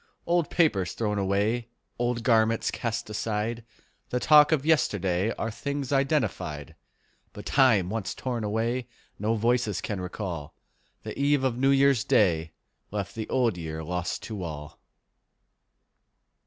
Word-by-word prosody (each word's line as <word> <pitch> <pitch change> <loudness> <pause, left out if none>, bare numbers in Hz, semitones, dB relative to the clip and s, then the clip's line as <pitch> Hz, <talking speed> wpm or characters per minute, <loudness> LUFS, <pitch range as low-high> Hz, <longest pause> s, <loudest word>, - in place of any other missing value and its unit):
Old 170 -2 +1
papers 105 - +2
thrown 105 -2 -1
away, 100 +5 0 0.3
Old 120 -1 -1
garments 115 -1 +3
cast 115 -1 -3
aside, 110 +2 -2 0.5
The 125 - 0
talk 150 +2 +6
of 150 -3 +1
yesterday, 100 - +2
Are 115 - -2
things 140 +3 -4
identified; 110 - -1 0.6
But - - -9
time 110 -10 +3
once 110 -4 -3
torn 120 -3 -3
away 115 +4 -1 0.3
No 110 +3 +1
voices 115 -2 +1
can 100 -3 -4
recall: 90 -5 -5 0.5
The - - -6
eve 140 -1 +2
of 125 -2 0
New 135 +1 +3
Year's 135 -4 +4
Day 80 -5 +2 0.4
Left 100 -1 -4
the 110 -1 -5
Old 115 -8 +1
Year 80 -1 -5
lost 90 +1 -3
to 105 -4 -6
all. 75 -4 -7
110 Hz, 135 wpm, -27 LUFS, 95-130 Hz, 0.6 s, talk